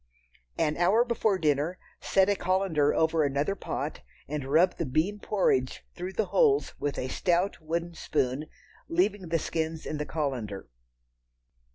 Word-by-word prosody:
An 150 - +1
hour 195 +8 +4
before 225 -4 +1
dinner, 155 +2 +1 0.2
set 190 -1 +3
a 205 - +3
colander 185 -6 +1
over 160 0 +2
another 145 +6 0
pot 200 - -4 0.3
and 145 -1 -3
rub 175 +4 +4
the 165 - -1
bean 165 +11 0
porridge 130 -12 0
through 180 +2 -6
the 215 - 0
holes 430 -4 +3
with 145 -1 -2
a 130 - -2
stout 175 +7 0
wooden 170 +2 -3
spoon, 145 -2 -1 0.4
leaving 185 +1 +1
the 165 - +2
skins 160 0 -3
in 155 - -4
the 150 - -2
colander. 125 - -3
165 Hz, 150 wpm, -28 LUFS, 150-190 Hz, 0.4 s, hour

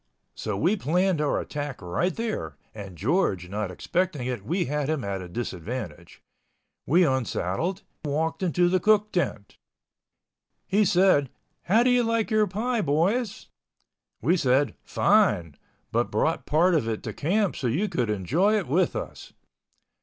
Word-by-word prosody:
So 105 -2 -4
we 175 - +2
planned 180 0 +1
our 150 - +1
attack 145 -3 -5
right 90 - -1
there, 230 -1 -4 0.2
and 100 -5 -9
George 100 - 0
not 105 0 -3
expecting 165 - -2
it, 125 -1 -3
we 180 +3 -1
had 145 +1 -2
him 155 -5 -1
at 100 -1 -3
a 90 - -8
disadvantage. 105 -2 -6 0.6
We 175 +6 +5
unsaddled—walked 155 - -2
into 175 -1 +2
the 185 +1 +2
cook 215 +1 +3
tent. 115 - -2 1.1
He 205 +2 +3
said, 180 -7 +4 0.4
"How 220 +6 +4
did 250 - +3
you 245 0 +4
like 230 -1 0
your 215 -1 +3
pie, 225 +5 -1
boys?" 195 - 0 0.7
We 170 +8 +3
said, 135 -4 +2
"Fine—but 80 -4 0
brought - - 0
part 170 +4 +3
of 150 -9 +1
it 110 -1 -3
to - - -5
camp 195 +5 0
so 130 - -2
you 160 - 0
could 120 - -1
enjoy 150 - +1
it 200 - -2
with 170 +6 +1
us." - - -7
155 Hz, 145 wpm, -26 LUFS, 120-190 Hz, 1.1 s, We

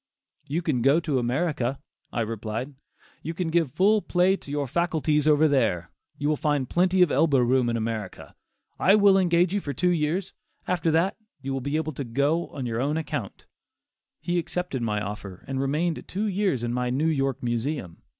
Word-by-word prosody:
"You 165 +5 -2
can 145 -7 0
go 140 +6 +4
to 150 -6 0
America," 130 0 -1 0.3
I 120 - -1
replied. 115 +4 -4 0.5
"You 165 +2 -5
can 180 -2 -2
give 160 -5 +1
full 210 +3 +4
play 185 +1 +2
to 170 - -12
your 145 0 -1
faculties 155 0 0
over 155 +1 +5
there; 90 - +1 0.3
you 145 - -2
will 155 - +2
find 145 -3 0
plenty 180 +3 +3
of 175 - +1
elbow 150 -4 +3
room 125 0 +3
in 115 - 0
America; 110 -3 -5 0.5
I 195 - +5
will 200 -2 +6
engage 175 -1 +3
you 205 - +1
for 145 - -4
two 180 +7 +1
years; 170 +3 -1 0.3
after 175 -2 +1
that 165 +5 +1 0.3
you 135 0 -3
will 135 - -2
be 140 +3 -2
able 155 0 -1
to 140 - -4
go 140 +8 0
on 135 -3 -6
your 115 0 -2
own 145 +4 0
account." 160 -2 -5 0.7
He 175 0 -1
accepted 175 -5 -3
my 105 -2 0
offer 100 -3 -7
and 135 0 -2
remained 155 +5 -1
two 200 +3 -2
years 195 - 0
in 120 0 -1
my 125 0 -1
New 135 +5 0
York 135 -6 0
Museum. 120 - -3
145 Hz, 190 wpm, -26 LUFS, 125-170 Hz, 0.7 s, will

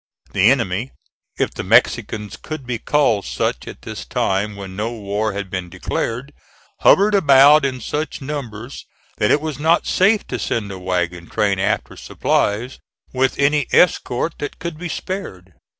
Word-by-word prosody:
The 100 +3 +4
enemy, 115 -2 0 0.4
if - - 0
the - - -4
Mexicans 105 -2 +2
could 155 - -7
be 120 -2 -3
called 115 -9 +2
such - - -2
at - - -10
this - - -6
time 100 +2 -1
when 95 -2 -8
no 110 +4 -2
war 105 -1 -2
had 100 0 -4
been 90 -3 -4
declared, 125 - -3 0.5
hovered 205 +2 +5
about 145 -4 +6
in 130 -2 -2
such 150 +7 -3
numbers 130 -4 -6 0.3
that 105 - +2
it - - +4
was 155 -3 -4
not 165 +3 +3
safe 205 +3 +3
to - - -3
send 105 -4 -2
a 95 - -7
wagon 90 -2 -2
train 100 -3 +1
after 100 +3 -1
supplies 115 +6 -1 0.3
with 130 0 +1
any 145 -1 +2
escort 160 -3 +2
that 145 - -5
could 160 -1 -6
be 175 0 -5
spared. 95 - -6
120 Hz, 160 wpm, -20 LUFS, 100-145 Hz, 0.5 s, about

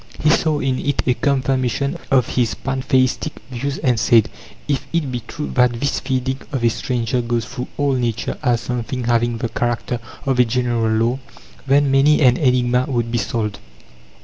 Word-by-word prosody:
He 155 - +3
saw 155 -2 +2
in 130 -2 0
it 145 - -1
a 125 - +3
confirmation 135 0 0
of 130 -3 +3
his 120 -3 0
pantheistic 130 +2 0 0.2
views, 135 +3 -3
and 125 -6 +1
said: 115 0 +4 0.4
"If 140 -2 -1
it 165 -6 -1
be 125 - -2
true 150 - -5
that 125 -2 +2
this 140 - 0
feeding 130 0 -2
of 135 -4 -2
a 115 - +5
stranger 120 +1 -1
goes 120 -1 -1
through 125 +3 -6
all 145 -1 +1
Nature 120 -3 -2
as 120 -5 +1
something 125 +1 -3
having 120 0 +1
the 115 0 -3
character 120 +1 -2 0.3
of 135 -2 +1
a - - +8
general 120 -1 0
law 115 +4 +1 0.5
then 140 0 +3
many 140 +3 +4
an 125 -3 +5
enigma 125 -2 +2
would 120 -3 -1
be 120 - +1
solved." 110 -4 -2
125 Hz, 175 wpm, -20 LUFS, 120-135 Hz, 0.5 s, a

